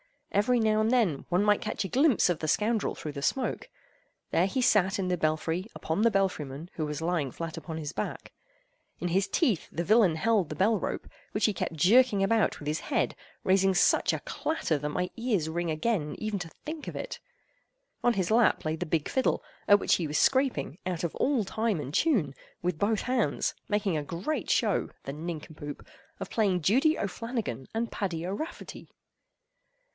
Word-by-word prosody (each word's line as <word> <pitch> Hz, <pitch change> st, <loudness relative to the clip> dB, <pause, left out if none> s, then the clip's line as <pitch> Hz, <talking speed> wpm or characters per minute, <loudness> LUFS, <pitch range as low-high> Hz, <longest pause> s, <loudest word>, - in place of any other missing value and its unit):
Every 230 Hz, +5 st, +3 dB
now 215 Hz, -1 st, +3 dB
and 220 Hz, -, +2 dB
then 225 Hz, -, +2 dB
one 180 Hz, +3 st, +2 dB
might 210 Hz, -1 st, +3 dB
catch -, -, -2 dB
a 195 Hz, -, -4 dB
glimpse 275 Hz, -1 st, +4 dB
of 175 Hz, -, 0 dB
the 155 Hz, -, -3 dB
scoundrel 215 Hz, +6 st, +1 dB
through 150 Hz, -, -6 dB
the 140 Hz, -1 st, -6 dB
smoke. 255 Hz, -, -1 dB, 0.6 s
There 180 Hz, -, +3 dB
he 260 Hz, +6 st, -1 dB
sat 205 Hz, -3 st, +3 dB
in 190 Hz, -2 st, -1 dB
the 180 Hz, -, +1 dB
belfry 160 Hz, +4 st, -1 dB
upon 160 Hz, +6 st, -2 dB
the 230 Hz, -, +5 dB
belfry 195 Hz, -7 st, 0 dB
man, 140 Hz, +6 st, -9 dB
who 155 Hz, -, -1 dB
was 150 Hz, +1 st, -4 dB
lying 165 Hz, -5 st, 0 dB
flat 165 Hz, +3 st, -5 dB
upon 160 Hz, -2 st, -6 dB
his 150 Hz, -2 st, -4 dB
back. -, -, -5 dB, 0.7 s
In 175 Hz, -, -2 dB
his 190 Hz, +3 st, +2 dB
teeth 240 Hz, -, +1 dB
the 170 Hz, -, -2 dB
villain 200 Hz, -3 st, +4 dB
held 205 Hz, +1 st, +2 dB
the 155 Hz, -, -5 dB
bell 205 Hz, +6 st, +2 dB
rope, -, -, -4 dB, 0.3 s
which 210 Hz, -, +2 dB
he 215 Hz, -, +2 dB
kept 175 Hz, -, -3 dB
jerking 205 Hz, -, +5 dB
about 220 Hz, +2 st, +2 dB
with 150 Hz, -, -9 dB
his 155 Hz, +1 st, 0 dB
head, -, -, 0 dB, 0.3 s
raising 190 Hz, 0 st, +3 dB
such 175 Hz, -, +4 dB
a -, -, -3 dB
clatter 310 Hz, -, -1 dB
that 150 Hz, +1 st, -3 dB
my 180 Hz, +4 st, -2 dB
ears 215 Hz, -10 st, 0 dB
ring 170 Hz, +1 st, -2 dB
again 155 Hz, -1 st, -1 dB
even 215 Hz, -2 st, -2 dB
to 170 Hz, -2 st, -6 dB, 0.2 s
think 310 Hz, 0 st, -6 dB
of -, -, -5 dB
it. -, -, -5 dB, 0.8 s
On 245 Hz, -, +3 dB
his 190 Hz, -2 st, -1 dB
lap 230 Hz, +1 st, +4 dB
lay 155 Hz, 0 st, 0 dB
the 180 Hz, -, -3 dB
big 155 Hz, -1 st, 0 dB
fiddle, 260 Hz, -, +1 dB, 0.2 s
at 205 Hz, 0 st, +7 dB
which -, -, +3 dB
he 170 Hz, -, -2 dB
was 150 Hz, +1 st, -1 dB
scraping, 255 Hz, -, +2 dB
out 180 Hz, -2 st, -2 dB
of 170 Hz, -, -1 dB
all 270 Hz, -5 st, +2 dB
time 215 Hz, -1 st, -1 dB
and 145 Hz, -1 st, -6 dB
tune, 205 Hz, -, +2 dB, 0.3 s
with 180 Hz, -3 st, -1 dB
both 210 Hz, +1 st, +1 dB
hands, 250 Hz, -2 st, 0 dB
making 205 Hz, -5 st, 0 dB
a 150 Hz, -, -2 dB
great 175 Hz, -, -3 dB
show, -, -, +2 dB
the 135 Hz, -, -5 dB
nincompoop! 155 Hz, -2 st, -7 dB, 0.4 s
of -, -, -5 dB
playing 195 Hz, -5 st, +2 dB
"Judy 275 Hz, -, +4 dB
O'Flannagan 200 Hz, -, -4 dB
and 230 Hz, +1 st, -1 dB
Paddy 175 Hz, -5 st, -3 dB
O'Rafferty." 205 Hz, -, -6 dB
190 Hz, 195 wpm, -29 LUFS, 160-225 Hz, 0.8 s, at